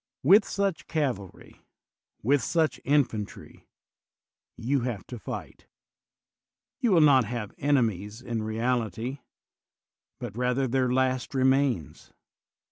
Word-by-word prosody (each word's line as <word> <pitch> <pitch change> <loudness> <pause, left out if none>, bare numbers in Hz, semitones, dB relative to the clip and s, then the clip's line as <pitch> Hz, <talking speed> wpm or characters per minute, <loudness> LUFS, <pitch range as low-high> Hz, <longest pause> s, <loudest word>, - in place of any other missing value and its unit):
With 195 - +6
such 200 -3 -2
cavalry, 125 - -4 0.6
with 140 +4 +3
such 160 +2 0
infantry, 125 -7 -1 0.9
you 135 +4 0
have 120 -5 -4
to 125 - -8
fight: - - -8 1.1
you 245 -5 +1
will 170 -4 +5
not 135 -5 +6
have 110 -2 -5
enemies 110 -7 0
in 120 -3 -4
reality, 115 +2 -2 1.0
but 120 -5 -7
rather 125 +2 0
their 130 0 +1
last 130 +1 0
remains. 130 - +1
125 Hz, 105 wpm, -27 LUFS, 115-140 Hz, 1.1 s, With